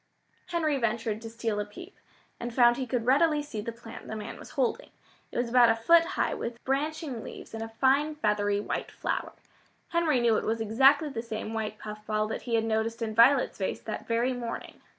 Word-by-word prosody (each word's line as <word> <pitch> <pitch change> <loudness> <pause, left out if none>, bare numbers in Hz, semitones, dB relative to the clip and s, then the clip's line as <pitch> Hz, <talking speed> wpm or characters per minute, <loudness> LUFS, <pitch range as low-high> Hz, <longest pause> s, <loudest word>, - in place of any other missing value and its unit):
Henry 310 -5 0
ventured 225 -2 -1
to 225 - -7
steal 225 -2 -2
a - - 0
peep, 350 - -12 0.4
and 240 0 -4
found 240 -2 +5
he 260 -2 -3
could 245 -3 -1
readily 295 +3 +3
see 225 -8 -5
the 230 - -4
plant 230 0 -11
the 220 - -5
man 215 - -7
was - - -11
holding. 270 - 0 0.4
It - - -6
was 240 0 +1
about 240 0 +6
a 225 - +4
foot 330 +9 +5
high - - +1
with 235 0 -5
branching 280 -2 -2
leaves - - -10
and 225 - -5
a 225 - -4
fine 275 +6 +2
feathery 205 -6 +1
white 205 - -3
flower. - - -3 0.6
Henry 330 -6 +2
knew 235 -2 +3
it - - -1
was 225 +1 -1
exactly 270 +8 +4
the 230 -5 -4
same 220 -1 -5
white 215 -1 -3
puffball 215 0 -3
that - - -3
he 230 - +2
had 225 0 +2
noticed 225 +1 -1
in 220 -1 -3
Violet's 250 +3 +5
vase 190 - -2
that 215 - -6
very 235 +3 +1
morning. 240 -2 -6
235 Hz, 210 wpm, -28 LUFS, 220-270 Hz, 0.6 s, about